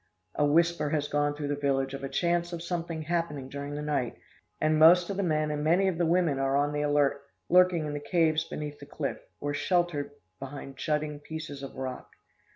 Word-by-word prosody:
A 150 Hz, -, +1 dB
whisper 165 Hz, +1 st, +3 dB
has 145 Hz, -1 st, 0 dB
gone 145 Hz, 0 st, 0 dB
through 145 Hz, -1 st, -4 dB
the 145 Hz, -, 0 dB
village 135 Hz, -1 st, 0 dB
of 135 Hz, 0 st, -6 dB
a 135 Hz, -, -3 dB
chance 175 Hz, +1 st, 0 dB
of 170 Hz, -1 st, -5 dB
something 170 Hz, -2 st, -3 dB
happening 150 Hz, -5 st, -2 dB
during 140 Hz, +1 st, -5 dB
the 150 Hz, -, -4 dB
night, 145 Hz, -5 st, -1 dB, 0.4 s
and 155 Hz, 0 st, +2 dB
most 175 Hz, +3 st, +7 dB
of 195 Hz, -, -4 dB
the -, -, +1 dB
men 155 Hz, -4 st, +1 dB
and 150 Hz, 0 st, -2 dB
many 175 Hz, +5 st, +3 dB
of 180 Hz, -3 st, -1 dB
the 170 Hz, -, +2 dB
women 165 Hz, -5 st, +2 dB
are 135 Hz, 0 st, +2 dB
on 145 Hz, +1 st, +1 dB
the 150 Hz, -, -1 dB
alert, 145 Hz, -1 st, +2 dB, 0.3 s
lurking 180 Hz, -3 st, +5 dB
in 150 Hz, -, -3 dB
the 145 Hz, -, -3 dB
caves 160 Hz, -1 st, +2 dB
beneath 150 Hz, -2 st, -6 dB
the 145 Hz, -, -11 dB
cliff, 145 Hz, -1 st, -3 dB, 0.2 s
or 145 Hz, 0 st, -2 dB
sheltered 170 Hz, -3 st, 0 dB, 0.3 s
behind 135 Hz, 0 st, -7 dB
jutting 150 Hz, 0 st, -1 dB
pieces 150 Hz, -2 st, -7 dB
of 135 Hz, -, -8 dB
rock. 130 Hz, -1 st, -5 dB
150 Hz, 210 wpm, -29 LUFS, 145-170 Hz, 0.4 s, most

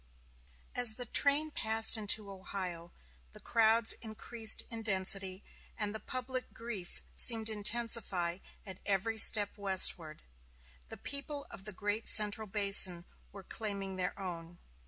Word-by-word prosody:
As 240 Hz, -3 st, +4 dB
the 245 Hz, -, -7 dB
train 285 Hz, +5 st, +2 dB
passed 220 Hz, -4 st, +1 dB
into 210 Hz, -1 st, +1 dB
Ohio, 185 Hz, -3 st, -8 dB, 0.4 s
the -, -, -8 dB
crowds 225 Hz, 0 st, +3 dB
increased 220 Hz, 0 st, 0 dB
in 230 Hz, -1 st, -7 dB
density, 190 Hz, -2 st, -1 dB, 0.3 s
and 210 Hz, -1 st, -3 dB
the 220 Hz, -, -6 dB
public 255 Hz, +1 st, -7 dB
grief 220 Hz, -6 st, -9 dB
seemed 225 Hz, -2 st, +2 dB
intensified 205 Hz, -5 st, -1 dB, 0.2 s
at 190 Hz, -3 st, -9 dB
every 205 Hz, +3 st, -2 dB
step 205 Hz, -1 st, +6 dB
westward. 185 Hz, -5 st, +1 dB, 0.7 s
The -, -, -9 dB
people 280 Hz, 0 st, -6 dB
of 195 Hz, -3 st, -12 dB
the 210 Hz, -, -7 dB
great 205 Hz, +3 st, -4 dB
central 210 Hz, 0 st, +3 dB
basin 195 Hz, -3 st, +4 dB, 0.3 s
were 195 Hz, -1 st, -13 dB
claiming 200 Hz, -2 st, -6 dB
their 180 Hz, -1 st, -4 dB
own. 175 Hz, -2 st, -9 dB
210 Hz, 130 wpm, -31 LUFS, 190-225 Hz, 0.7 s, step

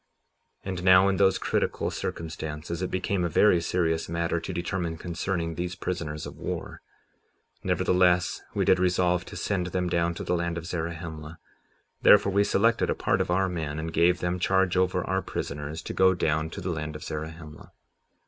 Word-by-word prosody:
57:16 -, -, -7 dB
And 90 Hz, -2 st, -4 dB
now, 95 Hz, +1 st, +7 dB
in 95 Hz, -, 0 dB
those 95 Hz, -1 st, +4 dB
critical -, -, -1 dB
circumstances, 80 Hz, +1 st, -5 dB
it 95 Hz, -, -1 dB
became 95 Hz, 0 st, -1 dB
a 85 Hz, -, 0 dB
very 90 Hz, 0 st, +4 dB
serious 80 Hz, -1 st, 0 dB
matter 85 Hz, 0 st, -1 dB
to 80 Hz, -, -6 dB
determine 85 Hz, -1 st, -3 dB
concerning 85 Hz, 0 st, -3 dB
these 90 Hz, +2 st, -4 dB
prisoners 75 Hz, -6 st, -4 dB
of -, -, -9 dB
war; -, -, -5 dB, 0.8 s
nevertheless, 90 Hz, -1 st, +2 dB
we -, -, +1 dB
did 95 Hz, -, +4 dB
resolve 90 Hz, -1 st, +2 dB
to -, -, -10 dB
send 95 Hz, -4 st, -1 dB
them 90 Hz, 0 st, -1 dB
down 85 Hz, 0 st, +1 dB
to -, -, -5 dB
the 90 Hz, -, 0 dB
land 85 Hz, 0 st, -2 dB
of 85 Hz, -, -6 dB
Zarahemla; 85 Hz, -2 st, -5 dB, 0.6 s
therefore 100 Hz, -, +6 dB
we 100 Hz, +1 st, +3 dB
selected 110 Hz, +3 st, +2 dB
a -, -, +1 dB
part -, -, +1 dB
of -, -, -2 dB
our 95 Hz, +2 st, +2 dB
men, 80 Hz, -5 st, -3 dB
and 80 Hz, +1 st, -4 dB
gave 85 Hz, +2 st, +3 dB
them 90 Hz, +1 st, -1 dB
charge 95 Hz, 0 st, +2 dB
over 90 Hz, -1 st, +1 dB
our 95 Hz, +1 st, 0 dB
prisoners 75 Hz, +1 st, -5 dB
to -, -, -5 dB
go 95 Hz, 0 st, +4 dB
down 80 Hz, -2 st, 0 dB
to -, -, -7 dB
the 90 Hz, +1 st, -2 dB
land 75 Hz, -2 st, -4 dB
of 75 Hz, -, -7 dB
Zarahemla. 80 Hz, 0 st, -7 dB
85 Hz, 185 wpm, -27 LUFS, 80-90 Hz, 0.8 s, now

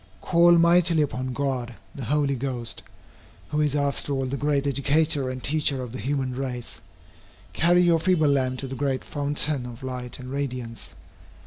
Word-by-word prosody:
Call 170 Hz, 0 st, +5 dB
mightily 170 Hz, -1 st, +4 dB
upon 130 Hz, -2 st, -3 dB
God 125 Hz, -2 st, -2 dB, 0.2 s
the 135 Hz, -, -6 dB
Holy 145 Hz, +1 st, +1 dB
Ghost, 125 Hz, -3 st, -4 dB, 0.7 s
who 150 Hz, -, 0 dB
is 150 Hz, -1 st, +1 dB
after 140 Hz, 0 st, -1 dB
all 135 Hz, -1 st, -1 dB
the 130 Hz, +2 st, -3 dB
great 145 Hz, 0 st, 0 dB
educator 140 Hz, 0 st, +2 dB
and 130 Hz, -1 st, -6 dB
teacher 145 Hz, -3 st, +1 dB
of 125 Hz, -, -7 dB
the 130 Hz, -, -6 dB
human 130 Hz, +2 st, -2 dB
race. 125 Hz, -2 st, -5 dB, 0.7 s
Carry 175 Hz, +2 st, +4 dB
your 170 Hz, -2 st, +4 dB
feeble 175 Hz, -2 st, +2 dB
lamp 130 Hz, -2 st, +1 dB
to 135 Hz, -, -5 dB
the 130 Hz, -, -6 dB
great 135 Hz, -1 st, -1 dB
fountain 145 Hz, -2 st, -1 dB
of 120 Hz, +1 st, -10 dB
light 125 Hz, -2 st, -4 dB
and 130 Hz, 0 st, -9 dB
radiance. 125 Hz, -4 st, -5 dB
140 Hz, 165 wpm, -25 LUFS, 130-150 Hz, 0.7 s, Call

